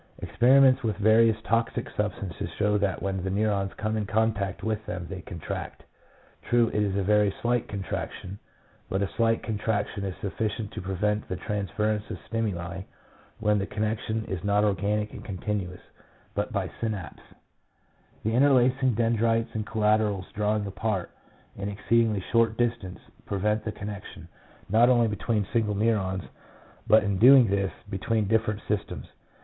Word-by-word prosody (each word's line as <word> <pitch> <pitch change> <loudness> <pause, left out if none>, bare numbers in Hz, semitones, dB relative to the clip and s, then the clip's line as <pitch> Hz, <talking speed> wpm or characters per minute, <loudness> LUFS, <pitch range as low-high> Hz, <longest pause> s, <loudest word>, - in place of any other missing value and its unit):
Experiments 130 +2 +4
with 110 -4 -1
various 110 +1 +4
toxic 115 +1 0
substances 95 -4 -3
show 105 0 +2
that 100 -2 0
when 95 -2 -2
the 95 - -2
neurons 100 -1 0
come 110 0 -1
in 105 -2 -2
contact 110 -3 0
with 110 -1 -1
them 90 0 -4
they 95 0 -6
contract. 85 -3 -6 0.6
True, 120 -1 +2
it 105 - 0
is 100 -2 0
a 100 - +1
very 105 0 +3
slight 120 0 +1
contraction, 95 -1 -5 0.5
but 95 +1 0
a 95 - -2
slight 115 -1 +2
contraction 105 -2 -2
is 95 -2 -3
sufficient 105 +1 -3
to - - -6
prevent 105 +3 -1
the 95 - -2
transference 105 +2 -2
of - - -4
stimuli 95 -5 -3 0.6
when 105 -2 +2
the 100 - -2
con 105 - -3
nection 110 0 -2
is 95 -3 -4
not 100 0 +2
organic 105 +1 0
and - - -9
continuous, 95 -2 -4 0.5
but - - -2
by - - -1
synapse. 105 -6 -4 1.0
The 110 - 0
interlacing 130 -1 +4
dendrites 115 0 +1
and 110 -1 -3
collaterals 105 -3 +1
drawing 105 0 0
apart 100 -1 -2 0.5
an 100 +1 -3
exceedingly 110 0 +1
short 115 -1 +3
distance, 115 -6 -1 0.3
prevent 105 +2 0
the 110 - -1
connection, 105 -1 -8 0.4
not 115 +5 +5
only 120 -2 +4
between 105 0 -1
single 110 -3 +1
neurons, 100 -3 0 0.6
but 110 0 +6
in 100 -2 -1
doing 125 -1 +8
this, 100 -1 +1 0.2
between 105 +2 -1
different 110 -1 +1
systems. 105 -1 -2
105 Hz, 150 wpm, -27 LUFS, 100-115 Hz, 1.0 s, doing